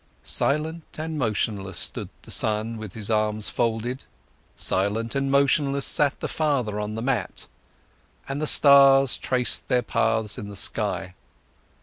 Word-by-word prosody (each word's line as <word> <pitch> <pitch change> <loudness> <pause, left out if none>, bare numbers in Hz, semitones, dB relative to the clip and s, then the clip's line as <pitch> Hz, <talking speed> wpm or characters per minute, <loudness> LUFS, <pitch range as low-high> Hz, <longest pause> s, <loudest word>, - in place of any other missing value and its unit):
Silent 155 +3 -1
and 155 0 -4
motionless 105 - -2
stood - - -2
the - - -7
son 110 +1 +1
with 110 -4 -8
his 110 0 -3
arms 105 0 0
folded, 120 +3 -2 0.5
silent 105 +4 -1
and 135 0 -1
motionless 140 0 +2
sat 145 -2 +2
the - - -2
father 130 -9 -1
on 105 0 -4
the 115 - -4
mat, 130 -1 -2 0.8
and 140 +2 -4
the 155 - 0
stars 135 -2 +6
traced 125 -1 0
their 125 -2 +1
paths 110 -1 0
in 100 - -7
the 100 - -9
sky. 95 0 0
120 Hz, 140 wpm, -24 LUFS, 105-140 Hz, 0.8 s, stars